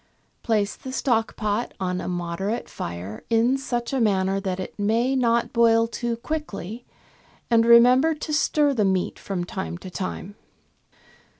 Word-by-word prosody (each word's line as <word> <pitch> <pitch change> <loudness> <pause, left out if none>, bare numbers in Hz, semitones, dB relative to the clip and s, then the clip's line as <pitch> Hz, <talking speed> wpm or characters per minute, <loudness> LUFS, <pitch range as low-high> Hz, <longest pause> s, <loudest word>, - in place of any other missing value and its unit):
Place 210 -3 0
the 260 - -8
stock 240 -4 0
pot 215 +2 -2
on 180 -1 -2
a - - -5
moderate 180 +5 -3
fire 90 +5 -6
in 230 +3 +3
such 240 -2 -3
a 265 - +1
manner 195 -2 +2
that 190 -2 -3
it 185 - -7
may 230 +6 +1
not 235 -2 +1
boil 230 -1 +4
too 235 0 -3
quickly, 235 - -5 0.6
and 230 0 +4
remember 250 +7 +6
to 305 0 -5
stir 295 -1 +2
the 220 -5 +1
meat 190 -2 0
from 190 -3 -3
time 180 -1 -5
to 185 +1 -10
time. 185 +1 -5
225 Hz, 155 wpm, -24 LUFS, 190-240 Hz, 0.6 s, remember